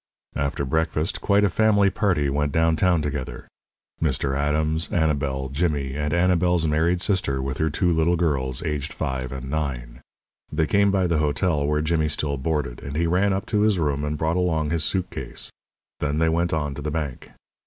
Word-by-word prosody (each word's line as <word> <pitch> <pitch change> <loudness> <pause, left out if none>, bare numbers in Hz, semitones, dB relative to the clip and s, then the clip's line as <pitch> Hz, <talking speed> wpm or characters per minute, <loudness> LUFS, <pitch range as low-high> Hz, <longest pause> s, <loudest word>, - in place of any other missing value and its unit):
After 70 0 -1
breakfast 80 +3 -1
quite 100 0 +3
a - - +5
family 100 0 +3
party 90 -10 +1
went 70 +1 0
downtown 80 +1 +2
together 70 -4 -4 0.5
Mr. 70 -3 0
Adams, 75 +3 0
Annabel, 70 -5 0
Jimmy, 70 -2 -1
and 75 0 -2
Annabel's 90 0 +2
married 80 +3 +1
sister 90 -10 +1
with 65 0 -3
her 80 - +2
two 90 +4 +1
little 80 +2 +2
girls, 70 -7 -1
aged 75 -2 -3
five 65 -1 -3
and 65 -1 -6
nine. 65 -5 -4 0.5
They 80 - +1
came 100 +3 +3
by 95 -2 +2
the 85 -3 +1
hotel 75 0 +1
where 75 0 +1
Jimmy 80 0 +1
still 75 -1 -1
boarded, 70 -3 -2
and 70 +1 -6
he 85 +2 +1
ran 90 +4 +2
up 95 +1 -1
to 105 - +3
his 105 -2 +3
room 75 -3 0
and 75 +1 -2
brought 80 +3 0
along 80 -4 0
his 80 -2 0
suit 95 +4 -1
case. - - -6 0.5
Then 75 0 -1
they 80 +1 +3
went 85 +1 +1
on 75 -3 -1
to 70 - -7
the 75 - -3
bank. 75 -4 -4
75 Hz, 185 wpm, -24 LUFS, 70-85 Hz, 0.5 s, a